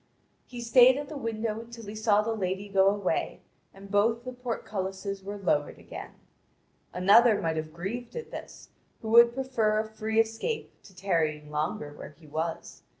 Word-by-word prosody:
He 245 -1 -8
stayed 250 +2 +6
at 290 -1 -5
the 310 - -7
window 225 -2 -2
until 230 0 -10
he 205 - -7
saw 215 -1 +2
the 225 +1 -1
lady 190 -1 -3
go 195 -1 +4
away, 200 -1 0 0.3
and 195 0 -13
both 225 +3 +2
the 255 0 -6
portcullises 200 -5 -4
were 200 +1 -6
lowered 150 -7 0
again. - - -9 0.8
Another 205 +4 +5
might 160 -1 -1
have 155 0 -4
grieved 195 +9 -6
at 475 - -6
this, - - -9 0.3
who 220 - -4
would 235 +1 +7
prefer 240 -5 +1
a 215 - 0
free 220 0 -1
escape 225 - -1
to 190 - -16
tarrying 155 -6 -1
longer 150 -1 -3
where 150 0 -11
he 160 - -17
was. 160 +2 -4
210 Hz, 170 wpm, -28 LUFS, 190-230 Hz, 0.8 s, would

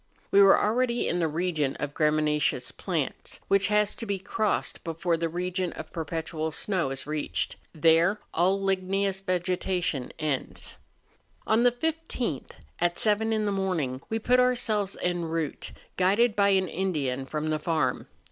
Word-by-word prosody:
We 200 - +6
were 195 -1 +7
already 240 +2 +1
in 175 - 0
the 165 - +2
region 155 -3 -1
of 145 -1 -4
graminaceous 150 -1 +1
plants, - - -3
which 195 -1 +4
has 210 0 +2
to 230 - -6
be 200 -1 -1
crossed 205 +2 -1
before 165 +1 -1
the 165 0 -1
region 180 +1 -2
of 155 - -9
perpetual 160 -1 -3
snow 180 -2 0
is 135 0 -5
reached; 150 0 -2 0.2
there 165 +5 +3
all 185 +4 +2
ligneous 195 0 0
vegetation 180 -6 -1
ends. 150 -4 -3 0.7
On 220 +2 +3
the 245 0 +5
15th, 260 - -3 0.3
at 175 0 +1
seven 220 +1 +1
in 215 -1 +1
the 205 - 0
morning, 175 -10 -1
we 225 - 0
put 250 +3 +3
ourselves 225 -6 +1
en 175 -1 0
route, 165 -2 -3 0.3
guided 210 +5 +3
by 200 -1 +4
an 190 -1 +3
Indian 145 -9 -2
from 155 +2 -2
the 155 - 0
farm. 150 -5 -1
180 Hz, 155 wpm, -27 LUFS, 160-205 Hz, 0.7 s, were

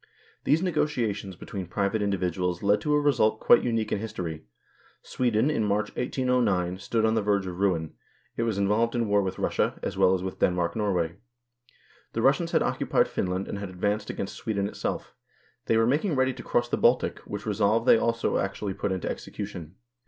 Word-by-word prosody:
These 155 +5 +3
negotiations 115 - -1
between 95 0 -7
private 100 +4 -1
individuals 90 -3 -1
led 100 +1 +3
to 150 - 0
a - - +4
result 120 -7 +2
quite - - +6
unique 115 -2 -1
in - - 0
history. 85 -7 -5 0.6
Sweden 120 +2 +1
in 115 - 0
March, 105 +1 -1
1809, 120 -9 0
stood 110 +2 0
on 110 - +2
the 110 - +2
verge 100 -1 +1
of 90 -1 -6
ruin: 85 -6 0 0.4
it - - -2
was 115 -3 0
involved 105 +4 +1
in 120 -2 0
war 105 0 +3
with 95 -1 -3
Russia, - - 0
as - - -3
well 95 0 +5
as 90 - -4
with 95 - -5
Denmark 90 -1 +1
Norway. 90 -6 0 1.0
The - - -1
Russians - - +3
had - - +3
occupied - - +1
Fin - - -1
land 90 +2 -2
and 100 - -4
had 100 -2 -5
advanced 105 +3 -2
against 95 - -4
Sweden 100 -3 -2
itself; - - -4 0.5
they 115 - +3
were 115 - +4
making 150 - +1
ready 130 0 +2
to - - -9
cross 120 0 0
the - - -1
Baltic, 125 +2 +2
which 105 -1 -5
resolve 110 +2 +1
they 115 - +6
also 115 0 0
actually 100 0 -3
put 100 +1 -2
into 95 -2 -2
execution. 95 -4 -6
105 Hz, 190 wpm, -27 LUFS, 95-115 Hz, 1.0 s, quite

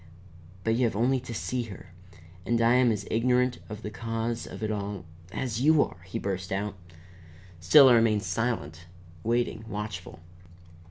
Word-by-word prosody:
But 115 - +1
you 120 +2 +2
have 115 - -1
only 125 +5 +2
to 125 -1 -9
see 125 +2 -2
her. 95 -4 -11 0.5
And 115 +5 +1
I 115 +1 +4
am 125 -1 +4
as 105 -1 -3
ignorant 125 +2 +2
of 105 +1 -8
the 105 - -5
cause 115 +1 -3
of - - -8
it 110 - -1
all 100 -4 -4 0.3
as 120 +1 -3
you 155 +1 +5
are!" 85 - -9
he - - -4
burst 95 -1 -4
out. 100 +2 -2 0.9
Still 135 - +8
I 125 - +7
remained 110 -3 +3
silent, 90 -10 -3 0.4
waiting, 115 -1 0
watchful. 105 -5 -6
115 Hz, 165 wpm, -28 LUFS, 100-120 Hz, 0.9 s, Still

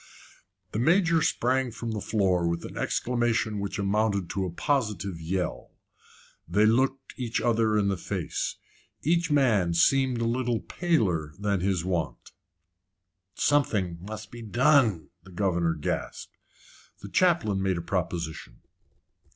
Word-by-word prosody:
The 105 - -2
Major 165 +4 +3
sprang 130 -1 +1
from 115 0 -5
the 105 -2 -3
floor 95 -5 +1
with 85 0 -2
an - - -9
exclamation 120 -3 0
which 100 0 -3
amounted 100 -1 0
to 95 -1 -1
a - - -5
positive 100 - -1
yell. 90 +1 -3 0.7
They 105 +1 +3
looked 130 +4 +1
each 120 -3 -2
other 110 -2 +2
in 100 -1 +2
the 100 -1 0
face. - - -3 0.5
Each 170 +2 +2
man 110 - +3
seemed 130 +7 +3
a 115 - 0
little 120 0 0
paler 95 - 0
than 100 -1 0
his 90 -2 0
wont. 85 -5 -3 1.0
"Something 100 -13 +1
must 110 +3 -8
be 120 - -9
done," 115 - +3
the 95 - -16
governor 85 -3 0
gasped. 75 - -4 0.7
The - - -7
chaplain 160 - +2
made 95 -2 0
a - - -3
proposition. 85 -7 -4
105 Hz, 135 wpm, -27 LUFS, 90-125 Hz, 1.0 s, Major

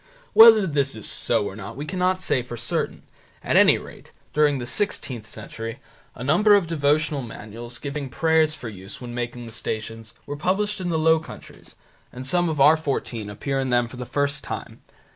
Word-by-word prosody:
Whether 225 -2 +9
this 140 -6 0
is 110 - -6
so - - 0
or 95 - -5
not 105 +3 -8
we 145 - -4
cannot 185 +2 0
say 125 - +1
for 120 -1 -8
certain. 120 - -2 0.4
At - - 0
any - - +7
rate, - - -13 0.2
during 150 -2 +3
the 125 - -5
sixteenth 125 - -3
century, 115 +1 -7 0.4
a 125 - -7
number 195 +10 +5
of 200 -3 +3
devotional 150 -2 +1
manuals, 115 0 -9
giving 140 +1 -5
prayers 160 +3 +2
for 125 - -8
use 95 -2 -8
when 120 -1 -8
making 120 0 -4
the 115 - -9
Stations, 115 -1 -5
were 145 - -5
published 195 +6 -1
in 180 - -2
the 165 - 0
Low 160 0 +4
Countries, 160 - -12 0.4
and 125 +1 -8
some 175 +5 +2
of 155 -3 -3
our 150 +4 +7
fourteen 125 -8 -3
appear 135 +6 -3
in 130 -1 -1
them 120 -1 +2
for 125 - -11
the 125 -1 -6
first 145 0 -1
time. - - -7
140 Hz, 195 wpm, -24 LUFS, 120-160 Hz, 0.4 s, Whether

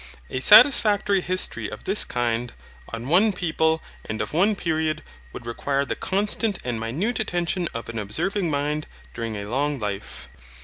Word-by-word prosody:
A 130 - -2
satisfactory 205 - +6
history 185 +1 0
of - - -9
this 195 +3 +3
kind, 120 0 -2 0.4
on 115 +2 -6
one 190 +8 +4
people, 160 -3 0 0.2
and 110 0 -5
of 105 +4 -3
one 200 +6 +3
period, 160 -4 -2 0.3
would 115 - -10
require 140 +4 -2
the - - -3
constant 205 +1 0
and 120 -2 -3
minute 160 - -2
attention 175 -3 -1
of 115 - -5
an 115 -1 -5
observing 170 - -2
mind 150 +1 -2 0.3
during 115 -2 -4
a 100 - -6
long 140 +5 -1
life. 100 - -6
155 Hz, 160 wpm, -23 LUFS, 120-195 Hz, 0.4 s, satisfactory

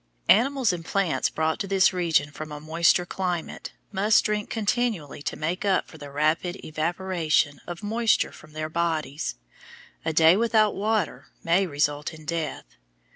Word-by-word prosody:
Animals 255 -1 +4
and 170 -2 -5
plants 190 0 0
brought 160 0 -1
to 200 - -3
this 195 -1 +4
region 160 -5 +1
from 155 0 -8
a 150 - -6
moister 165 +3 +2
climate 180 -2 -4 0.2
must 210 +2 +3
drink 210 -1 -1
continually 220 - -1
to - - -3
make 170 +6 -2
up 195 -2 +1
for 160 - -14
the 145 0 -8
rapid 155 +5 0
evaporation 160 -2 0
of 175 +1 -7
moisture 225 +1 +1
from 155 0 -15
their 155 0 -3
bodies; 160 - -2 0.7
a 160 - 0
day 160 +2 +6
without 220 -1 +3
water 215 +2 -1 0.2
may 180 +3 +2
result 145 +1 -1
in 155 -1 -14
death. 160 -3 -3
170 Hz, 155 wpm, -25 LUFS, 155-200 Hz, 0.7 s, day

